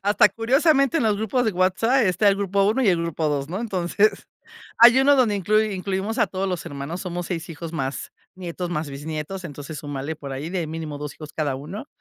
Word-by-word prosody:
Hasta 205 +1 +5
curiosamente 275 +5 +2
en - - 0
los 215 -2 +2
grupos 220 +4 0
de 220 - +1
WhatsApp 200 +8 +2
está 190 +2 +3
el 195 - +3
grupo 200 0 +1
1 220 +6 +2
y 225 - +3
el 175 -3 +3
grupo 165 -2 -1
2, 140 -1 -2
¿no? 180 +4 -3
Entonces 200 -1 0 0.5
hay 235 +2 +8
uno 285 +1 +5
donde 240 -6 +3
inclui 215 +2 +1
incluimos 195 +3 -3
a - - +4
todos 190 +1 -3
los 180 -3 -3
hermanos. 140 +5 -5
Somos 175 -2 -4
6 175 -1 -4
hijos 165 0 -7
más 135 -4 -4 0.2
nietos, 180 -1 -5
más 150 -3 -3
bisnietos, 155 +6 -5
entonces 145 0 -7
súmale 145 +1 -5
por 140 -3 -8
ahí 145 +5 -5
de 175 -3 -2
mínimo 155 -2 -5
2 150 -1 -6
hijos 155 -1 -10
cada 145 -4 -1
uno. 175 - -7
185 Hz, 215 wpm, -23 LUFS, 155-210 Hz, 0.5 s, hay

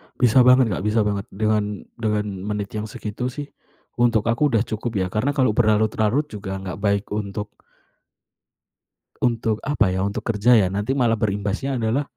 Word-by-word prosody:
Bisa 125 +1 +4
banget, 125 -3 +6
Kak, - - -1
bisa 105 0 +2
banget. 100 -1 -2
Dengan 105 0 -1 0.2
dengan 105 -2 0 0.2
menit 105 -1 -3
yang 110 0 -4
segitu 110 +3 -5
sih 145 +3 -6 0.5
untuk 115 -3 +3
aku 150 +6 +2
udah 115 -5 +2
cukup 110 +1 -4
ya. 95 -2 0
Karena 135 +8 0
kalau 130 -5 +3
berlarut-larut 110 +5 +1
juga 100 -2 -5
nggak 95 -1 -6
baik 100 0 +1
untuk 105 0 -4 1.7
Untuk 115 -3 0
apa 135 -8 +2
ya, 95 0 -1
untuk 100 +1 -3
kerja 115 +2 +2
ya. 95 - +3
Nanti 100 +6 -2
malah 120 -4 +2
berimbasnya 105 +5 -2
adalah 115 +5 0
110 Hz, 165 wpm, -22 LUFS, 105-120 Hz, 1.7 s, banget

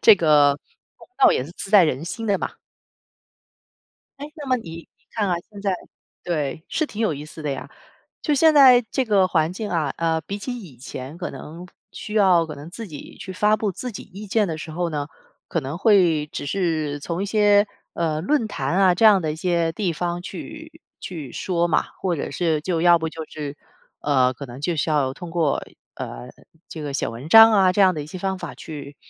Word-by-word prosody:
这 220 - +8
个 145 -5 +4 0.4
公 - - -17
道 375 -5 +6
也 - - 0
是 155 - -10
自 195 - -7
在 200 -5 +7
人 150 0 -1
心 225 +6 -5
的 200 -2 +2
嘛。 - - -3 1.7
诶， 290 +1 -7
那 290 -2 -8
么 255 -1 +2
你 195 -9 -9
你 165 0 -10 0.2
看 210 -3 0
啊， 180 - +2 0.2
现 205 -1 -10
在 195 -2 +1 0.5
对， 155 -2 -2
是 315 - 0
挺 215 - -8
有 215 -9 +1
意 145 +1 -7
思 155 +1 -11
的 150 - -2
呀。 135 0 -5 0.5
就 300 - +1
现 320 +3 +5
在 255 -4 +8
这 265 - 0
个 200 -5 +3
环 160 -2 +1
境 205 +3 -5
啊， 155 -5 0
呃， 165 -1 0
比 200 - -5
起 245 +4 -5
以 170 - -12
前， 130 +4 -8
可 180 0 -5
能 170 +4 -9 0.3
需 210 - -7
要 185 -5 +5
可 155 - -7
能 145 +3 -10
自 225 +3 -7
己 150 -5 -10
去 190 - -7
发 210 +3 +3
布 210 -2 -2
自 250 +7 -5
己 200 - -7
意 200 +4 -10
见 210 +1 +2
的 160 -2 -4
时 160 - -7
候 175 +1 -2
呢， 145 -2 -3 0.4
可 165 - -1
能 140 +4 -5
会 180 -8 +4
只 150 - -6
是 155 -3 -1
从 170 +5 -3
一 - - -2
些， 205 0 +4 0.3
呃， 155 -2 -1
论 235 - +1
坛 145 -5 -2
啊， 190 -2 +5
这 220 +5 +5
样 200 -4 +6
的 155 -1 -1
一 - - -7
些 170 -1 0
地 190 -4 -1
方 175 +2 -3
去 315 - -9 0.2
去 155 -9 -7
说 175 -2 0
嘛。 170 - +2 0.2
或 185 -2 +1
者 145 - -4
是 160 0 0
就 165 0 -1
要 175 -1 +6
不 160 0 -2
就 160 0 -7
是， 150 -1 -7 0.4
呃， 130 -3 +2
可 140 - -8
能 125 +1 -10
就 165 +3 -1
是 155 - 0
要 140 -3 +1
通 175 +1 -9
过， 165 -4 0 0.3
呃， - - -7 0.4
这 155 - -7
个 145 - -4
写 135 - -1
文 115 +5 -8
章 225 +2 +10
啊， 190 -3 +4
这 205 - 0
样 185 -2 +5
的 150 - -4
一 145 - -9
些 180 +4 -8
方 190 0 -2
法 - - -7
去 145 -2 -9
170 Hz, 235 characters per minute, -23 LUFS, 150-205 Hz, 1.7 s, 章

